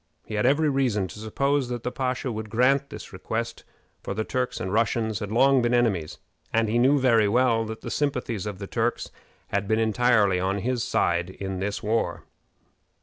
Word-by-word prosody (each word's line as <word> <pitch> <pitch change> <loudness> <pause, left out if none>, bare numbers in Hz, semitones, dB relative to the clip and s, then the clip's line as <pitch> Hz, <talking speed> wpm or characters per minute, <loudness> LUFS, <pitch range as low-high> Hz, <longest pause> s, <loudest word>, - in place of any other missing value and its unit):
He - - -8
had 105 +3 +2
every 150 +4 +3
reason 125 -9 +1
to - - -10
suppose 140 +5 0
that 120 -1 -4
the 125 - -2
pasha 130 0 -2
would 110 -1 -5
grant 130 +5 +2
this - - -10
request, 115 +5 -4 0.4
for 100 - -5
the 110 - -1
Turks 125 +1 -2
and 95 +1 -3
Russians 110 -1 +1
had 105 -1 -5
long 135 +3 +4
been 120 +1 +2
enemies, 100 -10 0 0.3
and 115 0 +2
he 115 +3 +1
knew 135 +4 +4
very 115 -5 +4
well 115 0 +2
that 110 0 -7
the - - -6
sympathies 125 -8 -2
of 105 -2 -5
the 100 - -6
Turks 115 +4 -2 0.4
had 100 0 -1
been 110 +1 +2
entirely 110 -3 +3
on 95 +2 0
his 125 -2 0
side 85 -6 0
in 95 0 -5
this 100 +2 -3
war. 105 -5 -1
115 Hz, 195 wpm, -25 LUFS, 105-125 Hz, 0.4 s, long